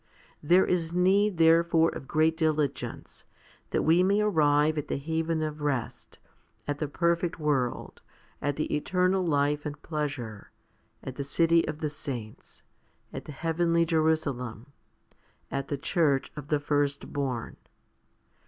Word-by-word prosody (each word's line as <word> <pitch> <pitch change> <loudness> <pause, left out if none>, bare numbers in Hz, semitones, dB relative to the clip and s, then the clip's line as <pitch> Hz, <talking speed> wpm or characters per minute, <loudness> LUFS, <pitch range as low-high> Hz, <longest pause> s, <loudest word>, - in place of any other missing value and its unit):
There 180 +5 +4
is 165 -2 0
need 190 +2 +3
therefore 165 0 +4
of 135 - -8
great 160 +3 +2
diligence, 155 -4 -2 0.5
that - - 0
we 165 +3 +4
may 200 +3 +3
arrive 155 -6 +3
at 150 - -6
the - - -2
haven 160 +2 -1
of 155 -1 -4
rest, 140 -5 -3 0.5
at 145 0 -2
the 150 - -1
perfect 170 +3 0
world, 140 -5 -1 0.4
at 145 -1 -1
the 155 - -1
eternal 185 +4 +1
life 145 -2 +1
and 145 -1 -6
pleasure, 140 -9 -4 0.5
at 130 -1 -7
the 140 - -2
city 165 +4 +2
of 155 0 -5
the 155 - -1
saints, 120 -7 -8 0.5
at - - -6
the - - -8
heavenly 165 +2 +1
Jerusalem, 140 -6 -1 0.8
at 140 0 -3
the 145 - -2
church 145 -2 +1
of 145 -1 -8
the 150 -1 +1
firstborn? 145 -3 -2
155 Hz, 135 wpm, -28 LUFS, 145-165 Hz, 0.8 s, There